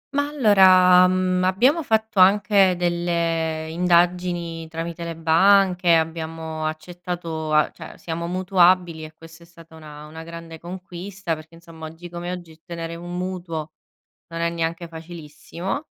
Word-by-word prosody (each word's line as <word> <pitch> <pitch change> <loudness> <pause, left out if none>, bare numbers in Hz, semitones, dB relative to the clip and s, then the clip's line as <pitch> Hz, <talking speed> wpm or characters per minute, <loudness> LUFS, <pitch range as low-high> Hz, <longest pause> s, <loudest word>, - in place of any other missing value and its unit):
Ma, 285 0 +1
allora, 185 -9 +6
uhm, 185 0 +1
abbiamo 250 - +3
fatto 220 -4 0
anche 195 0 +5
delle 170 -2 -1
indagini 175 -1 0
tramite 165 +1 -6
le 165 -1 -5
banche, 180 +1 +4
abbiamo 160 -1 -3
accettato 165 -1 -5
a 155 0 +3
cioè - - -12
siamo 170 0 -5
mutuabili, 180 -3 +2
e 155 - -12
questa 165 0 -15
è 170 - -16
stata 165 -1 -17
una 150 -1 -11
una 160 +1 -10
grande 165 -1 -10
conquista 180 0 -6
perché, 160 +1 -10
insomma, 165 -1 -11
oggi 165 +2 -11
come 175 +1 -5
oggi 175 -2 -8
ottenere 165 +1 -8
un 175 +1 -7
mutuo 175 -4 -5 0.6
non 165 0 -5
è 170 - +1
neanche 170 0 -3
facilissimo. 170 - -7
170 Hz, 140 wpm, -22 LUFS, 165-185 Hz, 0.6 s, allora